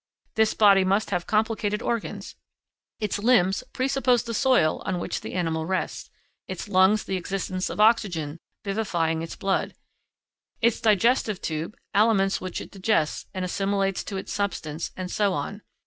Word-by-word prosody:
This 220 0 +2
body 200 -3 +6
must 195 +3 +1
have 180 -2 -1
complicated 215 0 0
organs; 230 -2 -3 0.7
its 210 -2 -1
limbs 205 -2 +3
presuppose 255 -2 +1
the 230 - -5
soil 250 - +3
on 185 - -2
which - - -3
the - - -7
animal 160 -3 -1
rests, 190 0 -2 0.4
its 185 0 -5
lungs 200 +2 +4
the 190 - -2
existence 185 0 -3
of - - -6
oxygen 175 -9 +2 0.2
vivifying 175 -6 -1
its 165 - -6
blood, 195 0 -1 0.8
its 235 -1 +2
digestive 215 0 +3
tube, 160 +6 -4 0.2
aliments 200 -2 +3
which 185 -1 -4
it - - -10
digests 190 -5 0
and 185 -1 -3
assimilates 195 +1 0
to 195 - -4
its 190 - -5
substance, 165 -6 -3
and 185 -1 -5
so 205 -2 +1
on. 185 +7 -4
195 Hz, 150 wpm, -25 LUFS, 180-215 Hz, 0.8 s, body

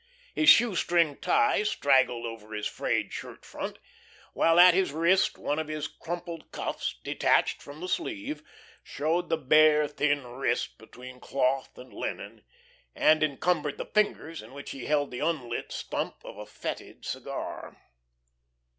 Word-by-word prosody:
His 310 - +4
shoestring 175 -9 +4
tie 275 - +2
straggled 130 - +2
over 110 -2 -7
his 105 0 -3
frayed - - -1
shirt - - -8
front, - - -6 0.6
while 165 +1 +4
at 180 0 +9
his 185 -3 +1
wrist 170 +5 +2
one 145 +2 -2
of 160 - -3
his 155 -1 -3
crumpled 170 -1 -7
cuffs, - - -3
detached - - +1
from 145 +2 -11
the 180 - -4
sleeve, 300 - -3 0.4
showed 165 +4 -1
the 165 - +2
bare, 150 +1 +5
thin 145 -2 0
wrist 125 0 -2
between 125 +3 -12
cloth 135 0 -1
and 125 0 -12
linen, - - -6 0.5
and 155 0 +4
encumbered 150 0 0
the - - -4
fingers 185 -6 0
in 110 +4 -14
which 140 0 -8
he 135 -3 -7
held 145 -1 +1
the 125 - -5
unlit 145 -7 -2
stump - - -3
of - - -9
a 105 0 -9
fetid 105 - -7
cigar. - - -6
150 Hz, 145 wpm, -28 LUFS, 130-170 Hz, 0.6 s, at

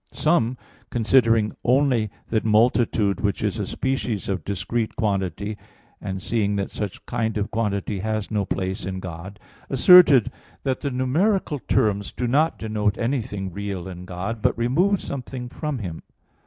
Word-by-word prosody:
Some, 130 -6 +1 0.3
considering 115 -2 +3
only 125 -4 +2 0.2
that 110 -1 +1
multitude 110 -2 +2
which 100 -1 -1
is 105 +1 -1
a 100 - -2
species 130 -7 -2
of 95 -5 -2
discrete 110 +5 -2
quantity, 100 - -2 0.4
and 95 -1 -4
seeing 105 0 0
that 100 -1 -2
such 105 -3 -5
kind 110 -2 -1
of 105 0 -2
quantity 105 -2 -1
has 110 +1 -2
no 105 -2 +1
place 95 +1 -3
in 95 0 -4
God, 95 +3 -8 0.3
asserted 140 - +7 0.3
that 130 -1 -1
the 140 - -1
numeral 150 +6 +1
terms 100 -2 +1
do 125 - -2
not 150 +7 +2
denote 105 -1 -1
anything 110 -7 -2
real 100 -3 -4
in 90 -1 -8
God, 95 +5 -4
but - - +1
remove 170 - +2
something 130 -2 -6
from 150 +1 -4
Him. 90 -8 -6
110 Hz, 150 wpm, -23 LUFS, 100-125 Hz, 0.4 s, asserted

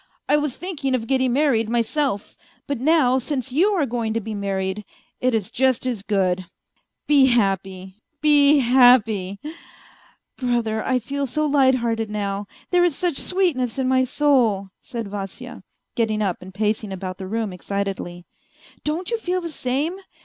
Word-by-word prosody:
I - - +4
was 295 -3 -1
thinking 295 -8 -2
of 230 -3 -3
getting 260 0 +1
married 250 -6 +2
myself; 235 -1 -1 0.3
but 280 -4 -3
now 265 -2 +3
since 260 -1 -3
you 325 +10 +3
are 320 -6 +2
going 230 -3 -2
to - - +2
be 220 0 -6
married, 195 0 -2 0.4
it 255 -2 +1
is 210 -4 -2
just 260 -1 +1
as 240 -6 -2
good! 185 -3 0 0.6
Be 280 -3 +5
happy, 195 -4 -1 0.2
be 295 -1 +5
happy!.. 235 -7 +4 0.4
." - - -25
" - - -47
Brother, 235 -4 0
I 255 - +1
feel 275 +3 -3
so 305 +5 -1
lighthearted 255 -6 +2
now, 200 -1 -3 0.2
there 355 -1 +4
is 345 -5 +2
such 345 -4 -1
sweetness 300 - 0
in 260 -1 0
my 260 0 +3
soul 245 -8 +2
..." - - -55
said 230 -3 -6
Vasya, 195 -1 -7 0.3
getting 215 -2 0
up 190 -4 -2
and 185 +1 -10
pacing 210 +1 -1
about 185 0 -6
the 190 - -6
room 220 -1 -2
excitedly. 185 -2 -4 0.3
" - - -25
Don't 330 +8 -2
you 465 - 0
feel 365 -3 -1
the 340 -2 -6
same 290 +7 -2
240 Hz, 170 wpm, -22 LUFS, 205-280 Hz, 0.6 s, Be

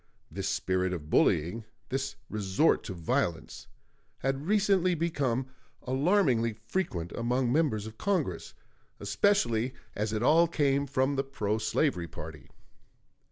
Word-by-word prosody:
This 95 +4 -3
spirit 95 0 0
of 75 -3 -6
bullying, 90 +9 +2 0.3
this 135 +1 -2
resort 105 +8 +2
to 95 - -4
violence, 85 0 -2 0.5
had 135 +3 -2
recently 195 -3 +3
become 140 -6 0 0.4
alarmingly 130 - +2
frequent 110 - -3
among 120 +1 0
members 130 -8 +1
of 110 0 -10
Congress, 165 - -1 0.4
especially 120 - +1 0.2
as 105 +1 -2
it 110 +1 -1
all 165 +6 +5
came 140 -3 +1
from 135 +1 +1
the 135 - +1
pro 110 -6 -2
slavery 110 - 0
party. 75 -3 -9
125 Hz, 120 wpm, -29 LUFS, 100-150 Hz, 0.5 s, all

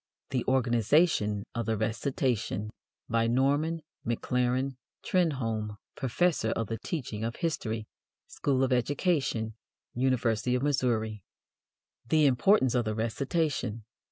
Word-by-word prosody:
The 130 -3 0
Organization 120 - +3
of 115 -1 -3
the 110 -1 +1
Recitation 110 -1 -1 0.4
BY 115 0 +2
NORMAN 145 +6 +1 0.2
MACLAREN 125 +3 0 0.3
TRENHOLME, 115 - 0 0.2
PROFESSOR 140 -1 +1
OF 115 - -1
THE 115 +2 -4
TEACHING 120 - -4
OF 115 +1 -2
HISTORY, 115 -9 -2 0.4
SCHOOL 135 -2 0
OF 130 0 +2
EDUCATION, 125 -3 0 0.4
UNIVERSITY 125 -1 +1
OF 125 - -1
MISSOURI. 115 -7 0 0.9
The 155 -1 +4
Importance 130 - +4
of 120 -3 +1
the 110 0 -1
Recitation. 115 0 -1
125 Hz, 110 wpm, -29 LUFS, 110-140 Hz, 0.9 s, The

